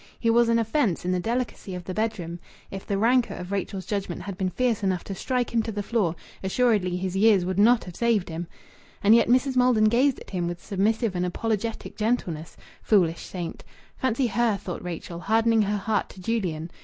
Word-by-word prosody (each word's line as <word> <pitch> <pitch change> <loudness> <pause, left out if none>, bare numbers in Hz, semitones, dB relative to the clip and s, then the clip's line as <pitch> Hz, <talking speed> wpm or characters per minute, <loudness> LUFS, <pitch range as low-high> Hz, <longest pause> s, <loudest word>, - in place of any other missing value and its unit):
He 230 - +2
was 235 0 +4
an 230 - +4
offence 225 - 0
in 180 - 0
the 185 - +1
delicacy 230 -2 -3
of 180 - -6
the 185 - -5
bedroom. 185 -6 -2 0.3
If 195 0 -7
the 200 - 0
rancour 240 +3 +2
of 180 +1 -7
Rachel's 195 -1 -3
judgment 195 -3 -3
had 195 0 -5
been 190 -1 -1
fierce 235 +3 0
enough 190 -3 0
to 195 - -6
strike 250 +6 -2
him 230 - +3
to 225 - -4
the 205 -1 -3
floor, 200 -6 0 0.3
assuredly 190 -3 +1
his 185 0 -3
years 200 -2 +4
would 185 +1 -1
not 230 +3 +5
have 180 -2 -10
saved 230 -5 +1
him! 165 +1 -5 0.6
And 205 +2 +7
yet 230 - +5
Mrs. 260 +2 +3
Maldon 250 -4 +4
gazed 255 +4 +2
at - - -13
him 175 -3 -1
with 175 0 -4
submissive 210 +1 0
and 180 - 0
apologetic 220 +4 -2
gentleness! 200 -8 -2 0.2
Foolish 175 -6 +2
saint! 175 -3 -6 0.3
Fancy 260 0 0
her 230 -1 +1
(thought 180 -2 -6
Rachel) 170 -1 -6
hardening 225 +3 +3
her 205 0 0
heart 205 +1 -1
to - - -13
Julian! 180 -6 -2
205 Hz, 205 wpm, -25 LUFS, 180-230 Hz, 0.6 s, And